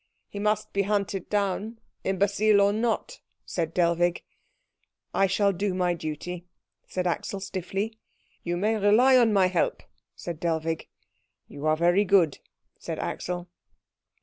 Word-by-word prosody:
"He 200 Hz, -, -7 dB
must 210 Hz, +1 st, 0 dB
be 200 Hz, -, +2 dB
hunted 200 Hz, -2 st, -1 dB
down, 205 Hz, +2 st, -1 dB, 0.2 s
imbecile 200 Hz, +2 st, +3 dB
or 200 Hz, 0 st, +4 dB
not," 235 Hz, -, -1 dB, 0.3 s
said 165 Hz, -3 st, -2 dB
Dellwig. 175 Hz, 0 st, +1 dB, 0.9 s
"I 195 Hz, -, +3 dB
shall 200 Hz, +1 st, +2 dB
do 195 Hz, +1 st, -1 dB
my 180 Hz, -1 st, +1 dB
duty," 170 Hz, +2 st, -6 dB, 0.4 s
said 185 Hz, -1 st, -3 dB
Axel 180 Hz, +3 st, -2 dB
stiffly. 195 Hz, +3 st, -4 dB, 0.4 s
"You 175 Hz, 0 st, -2 dB
may 215 Hz, +4 st, +1 dB
rely 220 Hz, +6 st, +5 dB
on 235 Hz, -3 st, +5 dB
my 195 Hz, -3 st, +4 dB
help," 185 Hz, -2 st, 0 dB, 0.3 s
said 170 Hz, -3 st, -6 dB
Dellwig. 165 Hz, -1 st, -1 dB, 0.6 s
"You 145 Hz, +2 st, -5 dB
are 155 Hz, 0 st, +3 dB
very 175 Hz, +4 st, +4 dB
good," 185 Hz, -7 st, +3 dB, 0.4 s
said -, -, -5 dB
Axel. 175 Hz, 0 st, -4 dB
190 Hz, 135 wpm, -26 LUFS, 175-205 Hz, 0.9 s, rely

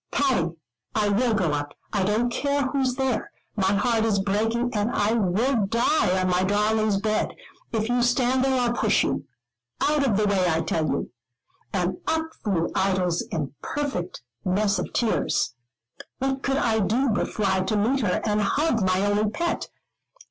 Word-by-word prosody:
"Patty, 255 Hz, -, +1 dB, 0.4 s
I 210 Hz, -2 st, +2 dB
will 225 Hz, +3 st, +2 dB
go 180 Hz, -7 st, +1 dB
up. 145 Hz, 0 st, -3 dB, 0.2 s
I 205 Hz, -, +1 dB
don't 215 Hz, +5 st, +1 dB
care 280 Hz, +3 st, 0 dB
who's 260 Hz, -1 st, 0 dB
there. 265 Hz, -3 st, -1 dB, 0.3 s
My 195 Hz, -2 st, +2 dB
heart 225 Hz, +2 st, +2 dB
is 220 Hz, -3 st, +2 dB
breaking, 225 Hz, +5 st, 0 dB
and 210 Hz, +1 st, 0 dB
I 210 Hz, -2 st, +1 dB
will 220 Hz, +2 st, +1 dB
die 230 Hz, -3 st, +2 dB
on 185 Hz, -, +1 dB
my 180 Hz, 0 st, +2 dB
darling's 210 Hz, +1 st, +2 dB
bed. 215 Hz, +2 st, -1 dB, 0.4 s
If 220 Hz, -1 st, -1 dB
you 245 Hz, +1 st, +1 dB
stand 250 Hz, +1 st, +2 dB
there, 265 Hz, -1 st, +2 dB
I'll 240 Hz, -1 st, +1 dB
push 220 Hz, -3 st, +2 dB
you. -, -, -2 dB, 0.5 s
Out 300 Hz, -1 st, +2 dB
of 230 Hz, -8 st, +2 dB
the 210 Hz, -, +2 dB
way, 195 Hz, -3 st, +2 dB
I 160 Hz, 0 st, +1 dB
tell 160 Hz, -1 st, -1 dB
you." -, -, -2 dB, 0.6 s
And 185 Hz, -1 st, -1 dB
up 320 Hz, 0 st, -1 dB
flew 185 Hz, -6 st, 0 dB
Idols, 185 Hz, -3 st, +1 dB
in 165 Hz, -, -1 dB
a 135 Hz, -, -6 dB, 0.2 s
perfect 225 Hz, -, -3 dB, 0.2 s
mess 200 Hz, +1 st, +1 dB
of 180 Hz, -, -4 dB
tears. 225 Hz, -, 0 dB, 0.6 s
What 270 Hz, 0 st, -1 dB
could 270 Hz, 0 st, 0 dB
I 225 Hz, -4 st, +1 dB
do 240 Hz, +6 st, +1 dB
but 210 Hz, -, 0 dB
fly 200 Hz, -3 st, 0 dB
to 190 Hz, +3 st, 0 dB
meet 240 Hz, +7 st, +2 dB
her, 205 Hz, -7 st, 0 dB
and 210 Hz, -1 st, +1 dB
hug 235 Hz, +1 st, +1 dB
my 185 Hz, +1 st, +2 dB
only 205 Hz, +1 st, +1 dB
pet? 340 Hz, +10 st, -2 dB
215 Hz, 175 wpm, -25 LUFS, 190-245 Hz, 0.6 s, I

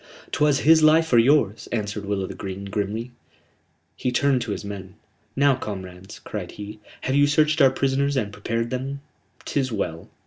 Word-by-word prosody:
"'Twas 145 Hz, -2 st, +2 dB
his 160 Hz, +1 st, +6 dB
life 160 Hz, 0 st, +4 dB
or 120 Hz, -, +7 dB
yours," 115 Hz, -4 st, +3 dB
answered 105 Hz, -2 st, -3 dB
Will 100 Hz, -1 st, -1 dB
o' -, -, -3 dB
th' -, -, -8 dB
Green, 95 Hz, 0 st, -6 dB
grimly. 105 Hz, +4 st, -3 dB, 0.8 s
He 125 Hz, -, -2 dB
turned 135 Hz, 0 st, +2 dB
to 115 Hz, -2 st, -3 dB
his 100 Hz, -, -4 dB
men. 100 Hz, -1 st, -7 dB, 0.4 s
"Now, 140 Hz, 0 st, +4 dB
comrades," 95 Hz, -6 st, -7 dB
cried -, -, -7 dB
he, 105 Hz, +1 st, -8 dB, 0.2 s
"have 130 Hz, -, -1 dB
you 145 Hz, +1 st, +5 dB
searched 155 Hz, +1 st, +3 dB
our 135 Hz, -, +8 dB
prisoners 135 Hz, +1 st, 0 dB
and 105 Hz, -5 st, -1 dB
prepared 115 Hz, +3 st, -2 dB
them? 135 Hz, +2 st, -4 dB, 0.4 s
'Tis 135 Hz, -3 st, -1 dB
well. 85 Hz, -6 st, -4 dB
120 Hz, 175 wpm, -24 LUFS, 100-140 Hz, 0.8 s, our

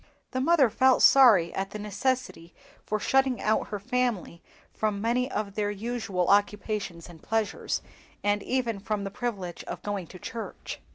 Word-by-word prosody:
Their 255 Hz, -, -1 dB
mother 285 Hz, -5 st, +4 dB
felt 260 Hz, +2 st, +4 dB
sorry 220 Hz, -11 st, +7 dB
at 195 Hz, 0 st, -2 dB
the 215 Hz, -, -6 dB
necessity 210 Hz, -3 st, -2 dB, 0.3 s
for 215 Hz, -, 0 dB
shutting 265 Hz, +2 st, +2 dB
out 215 Hz, +1 st, +1 dB
her 205 Hz, -, -4 dB
family 235 Hz, -7 st, -1 dB, 0.3 s
from 210 Hz, -2 st, -1 dB
many 240 Hz, +4 st, 0 dB
of 210 Hz, -5 st, -3 dB
their 205 Hz, 0 st, -1 dB
usual 205 Hz, -4 st, -2 dB
occupations 205 Hz, -3 st, 0 dB
and 170 Hz, -3 st, -13 dB
pleasures, 220 Hz, -1 st, -1 dB, 0.4 s
and 205 Hz, 0 st, +1 dB
even 235 Hz, -3 st, -1 dB
from 210 Hz, 0 st, -2 dB
the 195 Hz, -, -4 dB
privilege 195 Hz, -7 st, -4 dB
of -, -, -7 dB
going 200 Hz, -4 st, -3 dB
to 185 Hz, -, -11 dB
church. 225 Hz, +5 st, -7 dB
210 Hz, 160 wpm, -27 LUFS, 200-245 Hz, 0.4 s, sorry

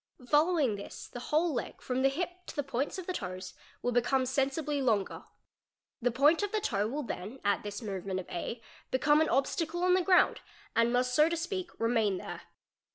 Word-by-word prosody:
Following 295 Hz, -, +3 dB
this 200 Hz, -, -8 dB
the 245 Hz, -, -8 dB
whole 320 Hz, +3 st, +3 dB
© -, -, -3 dB
leg, -, -, -4 dB
from 255 Hz, 0 st, -2 dB
the 270 Hz, -, +5 dB
hip 355 Hz, +5 st, -4 dB
to -, -, -8 dB
the 290 Hz, -, 0 dB
points 270 Hz, +5 st, -2 dB
of 370 Hz, -, -5 dB
the 370 Hz, -, -2 dB
toes, 185 Hz, -, -5 dB, 0.3 s
will 245 Hz, -, +1 dB
become 255 Hz, +2 st, +2 dB
sensibly 275 Hz, +3 st, 0 dB
longer. 220 Hz, -7 st, 0 dB, 0.8 s
The 245 Hz, -, +3 dB
point 290 Hz, -, +4 dB
of 410 Hz, -1 st, -1 dB
the 435 Hz, -, +1 dB
toe 210 Hz, -, 0 dB
will 290 Hz, +6 st, -3 dB
then 215 Hz, +2 st, -6 dB
at 200 Hz, 0 st, +2 dB
this 205 Hz, +2 st, -6 dB
movement 195 Hz, -2 st, -3 dB
of 185 Hz, -, -7 dB
A 225 Hz, +6 st, -4 dB, 0.3 s
become 295 Hz, +4 st, +4 dB
an 315 Hz, -, +2 dB
obstacle 325 Hz, +6 st, 0 dB
© -, -, 0 dB
on 365 Hz, 0 st, +4 dB
the 370 Hz, -, +4 dB
ground 365 Hz, 0 st, +4 dB, 0.3 s
and 230 Hz, +1 st, +4 dB
must 250 Hz, 0 st, +1 dB
so 305 Hz, +5 st, +5 dB
to 340 Hz, -, -1 dB
speak 360 Hz, +1 st, -3 dB
remain 225 Hz, -4 st, +2 dB
there. -, -, -7 dB
265 Hz, 210 wpm, -31 LUFS, 225-325 Hz, 0.8 s, the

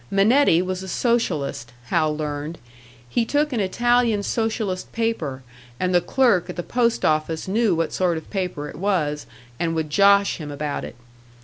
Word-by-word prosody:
Minetti 195 Hz, -, +4 dB
was 185 Hz, 0 st, -3 dB
a 190 Hz, -, -7 dB
Socialist, 155 Hz, -, -1 dB, 0.2 s
Hal 155 Hz, -3 st, +1 dB
learned; 150 Hz, +1 st, -4 dB, 0.5 s
he 230 Hz, -, +1 dB
took 295 Hz, +4 st, 0 dB
an 235 Hz, -, 0 dB
Italian 235 Hz, +2 st, +2 dB
Socialist 220 Hz, -4 st, -2 dB
paper, 165 Hz, -, -2 dB, 0.4 s
and 185 Hz, 0 st, 0 dB
the 175 Hz, -, +4 dB
clerk 235 Hz, -6 st, +2 dB
at -, -, -5 dB
the 175 Hz, -, -4 dB
post 235 Hz, +2 st, 0 dB
office 155 Hz, +2 st, 0 dB
knew 210 Hz, -1 st, +2 dB
what 165 Hz, -1 st, -1 dB
sort 180 Hz, -3 st, +1 dB
of 160 Hz, -, -8 dB
paper 180 Hz, -7 st, -3 dB
it -, -, -9 dB
was, 155 Hz, -6 st, -1 dB, 0.3 s
and 165 Hz, -1 st, 0 dB
would 155 Hz, -2 st, -2 dB
"josh" 200 Hz, +3 st, +4 dB
him 150 Hz, -3 st, -7 dB
about 145 Hz, 0 st, -4 dB
it. -, -, -8 dB
185 Hz, 170 wpm, -23 LUFS, 155-225 Hz, 0.5 s, Minetti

